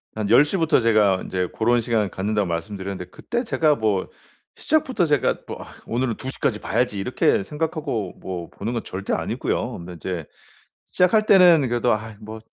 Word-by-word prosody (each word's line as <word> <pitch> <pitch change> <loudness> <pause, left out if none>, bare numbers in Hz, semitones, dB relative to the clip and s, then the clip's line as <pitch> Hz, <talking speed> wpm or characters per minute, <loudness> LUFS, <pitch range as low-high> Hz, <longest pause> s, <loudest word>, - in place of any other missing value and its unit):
한 105 -2 -2
10 125 +5 +8
시부터 165 0 +2
제가 110 -5 +3
인제 90 -1 -2
고런 120 +2 +2
시간 110 -3 0
갖는다고 105 +1 -1
말씀드렸는데 95 +1 -5
그때 240 +1 -3
제가 155 - +2
뭐 105 -6 0 0.5
시작부터 265 - +1
제가 145 -5 +1
뭐 - - -7
'아 - - -10 0.2
오늘은 120 0 -1
2:00 130 +1 -7
까지 105 -5 0
봐야지.' 120 -5 -1
이렇게 95 0 +1
생각하고 150 - -3
뭐 90 -2 -6
보는 110 +4 -4
건 115 - -3
절대 95 +2 -4
아니고요. - - -2
근데 85 +1 -9
이제 85 -1 -5 0.6
시작할 215 +4 +3
때는 175 -9 +6
그래도 120 0 +2
'아 110 0 -5
뭐 110 +1 -8
110 Hz, 355 characters per minute, -23 LUFS, 95-145 Hz, 0.6 s, 10